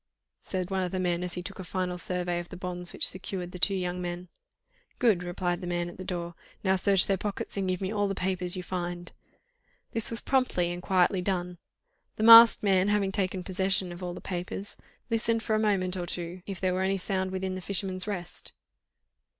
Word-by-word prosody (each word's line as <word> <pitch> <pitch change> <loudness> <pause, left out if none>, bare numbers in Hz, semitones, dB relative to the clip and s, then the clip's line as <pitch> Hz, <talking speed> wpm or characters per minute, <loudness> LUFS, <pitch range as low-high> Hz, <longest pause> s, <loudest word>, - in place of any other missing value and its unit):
said 185 0 -3
one 190 -1 0
of 180 -1 -2
the 185 - -2
men, 175 -1 0
as 180 -1 -5
he 180 - -4
took 195 +2 -7
a - - -4
final 180 0 -2
survey 180 0 -1
of 175 - -7
the 180 - -8
bonds 180 -1 -1
which - - 0
secured 185 -1 -5
the 180 - -8
two 195 +2 +2
young 180 -1 -2
men. 175 0 -5 0.7
"Good!" 220 -8 +3
replied 175 0 -2
the 180 - -5
man 175 0 -1
at 175 - -12
the 185 - -6
door; 175 -2 -4 0.3
"now 190 -1 +3
search 190 0 +4
their 195 - +1
pockets 205 0 -2
and 195 -2 -1
give 185 0 -1
me 190 +1 -2
all 205 -1 +1
the 195 - -2
papers 185 -1 -1
you 180 - -4
find." 175 -1 -4 0.8
This 225 - +2
was 230 - +1
promptly 250 -10 +1
and 175 0 -5
quietly 185 0 +2
done. 180 -2 -2 0.6
The 215 - -2
masked 230 0 +10
man 190 -1 +3
having 205 -2 +1
taken 190 -2 -1
possession 190 -1 0
of 175 +1 -9
all 180 -1 -4
the - - -8
papers, 180 +2 -4 0.4
listened 230 0 +1
for 220 - -1
a - - +2
moment 190 -4 +2
or 175 -1 -3
two 175 +1 -5
if 195 -3 -5
there 185 -1 +1
were 185 - -1
any 195 +1 +1
sound 190 0 -1
within 190 0 -3
"The 185 - -5
Fisherman's 190 0 -2
Rest." 180 -4 -5
185 Hz, 215 wpm, -28 LUFS, 180-195 Hz, 0.8 s, masked